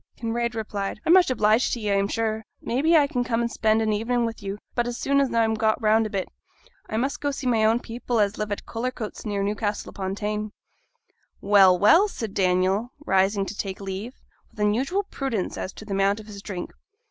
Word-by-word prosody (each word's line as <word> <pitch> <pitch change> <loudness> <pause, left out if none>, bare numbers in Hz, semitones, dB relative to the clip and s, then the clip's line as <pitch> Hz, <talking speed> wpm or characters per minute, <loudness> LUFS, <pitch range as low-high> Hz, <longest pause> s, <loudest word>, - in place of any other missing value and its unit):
Kinraid 235 0 -2
replied, 205 -2 -4
'I'm 330 - +5
much 370 -4 +6
obliged 220 -1 +2
to 240 - -2
ye, 210 -2 -1
I'm 200 0 +2
sure; 220 0 -2 0.2
maybe 310 +8 +2
I 295 - +5
can 250 -3 -1
come 230 -1 -1
and 235 0 -1
spend 220 0 +2
an 215 -1 +1
ev'ning 235 +3 0
wi' 230 - -1
you; 200 0 -5 0.2
but 240 0 0
as 240 0 -4
soon 280 0 +2
as 275 - 0
I'm 225 -1 +2
got 220 0 +1
round 220 0 +3
a - - -9
bit, 195 -2 -2 0.6
I 220 - -2
must 270 +4 -1
go 290 - 0
see 275 -1 -5
my 230 -3 +2
own 225 +2 +4
people 240 0 -3
as 205 -1 +1
live 210 -1 -2
at 205 - -4
Cullercoats 230 -2 -5
near 200 -1 -1
Newcastle 205 +1 -2
upo' 190 0 -3
Tyne.' 210 +1 -3 0.9
'Well, 195 -2 +6
well!' 215 - +6
said 225 - -6
Daniel, 190 +5 +1
rising 195 +1 +2
to 210 - -6
take 195 -2 -4
leave, 195 +5 -6 0.3
with - - -18
unusual 255 - +1
prudence 265 - -3
as 185 - -4
to 215 - -11
the 200 - -4
amount 195 +2 +2
of 215 - -10
his 205 -2 -10
drink. 190 -4 -6
220 Hz, 215 wpm, -25 LUFS, 200-240 Hz, 0.9 s, much